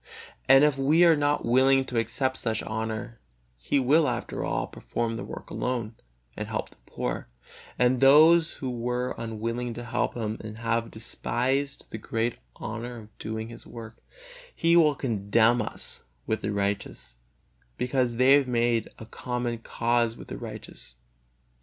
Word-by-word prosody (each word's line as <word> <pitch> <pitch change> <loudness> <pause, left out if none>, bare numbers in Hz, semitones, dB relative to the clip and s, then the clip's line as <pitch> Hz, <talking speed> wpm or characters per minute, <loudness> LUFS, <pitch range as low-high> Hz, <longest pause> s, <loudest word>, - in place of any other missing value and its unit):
And 135 +1 +8
if 150 -2 +3
we 155 +6 +5
are 165 -2 +6
not 145 0 +1
willing 130 +2 +4
to 125 -3 -1
accept 130 +3 -1
such 110 -2 -2
honor, 110 +1 -4 0.4
He - - -1
will, 145 +4 +4
after 120 -1 -3
all, - - -1
perform 115 -1 -3
the - - -5
work - - -9
alone, 120 -3 -2 0.4
and - - -4
help - - -4
the - - -21
poor; - - -4 0.5
and 125 0 +3
those 160 +5 +6
who 130 -2 -4
were 125 +1 -2
unwilling 115 +1 -3
to 120 - -6
help 120 +1 -1
Him 110 -2 -3
and 110 0 -8
have 115 0 -1
despised 130 +5 -2
the 110 - -5
great 115 +2 -2 0.2
honor 120 +2 -6
of 110 -2 -14
doing 110 +1 -4
His 115 0 -11
work, 115 -1 -10 0.5
He 165 +1 +3
will 155 -4 +5
condemn 115 -1 +2 0.7
with 110 - -1
the - - -3
unrighteous, 100 - -2 0.6
because 125 -1 0
they 130 +3 +6
have 140 -2 +4
made 120 -2 +1 0.2
common 120 -2 -3
cause 115 0 0
with - - -11
the - - -5
unrighteous. - - -8
120 Hz, 155 wpm, -27 LUFS, 115-130 Hz, 0.7 s, And